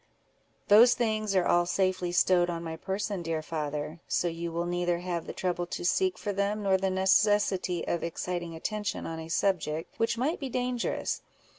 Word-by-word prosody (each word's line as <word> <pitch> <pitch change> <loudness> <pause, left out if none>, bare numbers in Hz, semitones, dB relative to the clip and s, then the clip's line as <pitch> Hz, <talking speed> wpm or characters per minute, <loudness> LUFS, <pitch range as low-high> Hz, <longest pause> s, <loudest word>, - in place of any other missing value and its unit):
"Those 225 +4 +7
things 215 -3 0
are 185 -2 +3
all 175 0 +3
safely 185 -1 0
stowed 175 0 +3
on 170 -1 -3
my 160 -1 -4
person, 195 +2 -3
dear 165 -2 -2
father; 150 0 -4
so 175 - +1
you 170 0 -4
will 170 +1 -2
neither 175 0 0
have 175 -1 -4
the - - -4
trouble 175 -1 -2
to 175 - -5
seek 370 - +2
for 205 - -3
them, 200 +2 -1
nor 195 -1 +3
the 190 0 +1
necessity 190 -1 +2
of 170 - -1
exciting 170 0 -3
attention 210 +4 -3
on 165 0 -5
a 160 0 -8
subject 165 -3 0
which 230 +1 +1
might 285 +8 0
be 275 -2 -4
dangerous. 250 -1 -2
180 Hz, 180 wpm, -29 LUFS, 170-205 Hz, -, Those